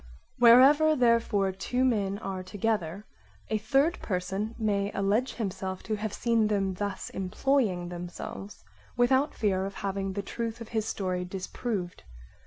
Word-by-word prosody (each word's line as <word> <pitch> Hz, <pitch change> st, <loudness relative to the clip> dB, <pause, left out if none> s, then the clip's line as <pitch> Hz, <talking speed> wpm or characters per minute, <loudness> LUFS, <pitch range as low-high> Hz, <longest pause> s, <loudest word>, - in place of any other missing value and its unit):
Wherever, 275 Hz, +6 st, +7 dB
therefore, 230 Hz, -6 st, +2 dB
two 245 Hz, +7 st, -1 dB
men 200 Hz, -5 st, +1 dB
are 195 Hz, -3 st, -5 dB
together, 200 Hz, -1 st, -2 dB, 0.4 s
a 215 Hz, -, 0 dB
third 275 Hz, -, +2 dB
person 195 Hz, +4 st, -3 dB
may 205 Hz, -3 st, 0 dB
alledge 205 Hz, +6 st, 0 dB
himself' 190 Hz, -3 st, -4 dB
to 220 Hz, -, -2 dB
have 215 Hz, 0 st, -3 dB
seen 230 Hz, -1 st, +1 dB
them 195 Hz, -2 st, 0 dB
thus 200 Hz, +1 st, -4 dB
employing 190 Hz, -2 st, 0 dB
themselves 175 Hz, +3 st, -7 dB, 0.3 s
without 260 Hz, +4 st, +3 dB
fear 190 Hz, -3 st, +1 dB
of 195 Hz, 0 st, -5 dB
having 195 Hz, -1 st, -3 dB
the 200 Hz, +1 st, -3 dB
truth 230 Hz, +2 st, -4 dB
of 230 Hz, -, -9 dB
his 220 Hz, -2 st, -1 dB
story 185 Hz, -4 st, -2 dB
disproved. 185 Hz, +1 st, -4 dB
205 Hz, 140 wpm, -28 LUFS, 190-235 Hz, 0.4 s, Wherever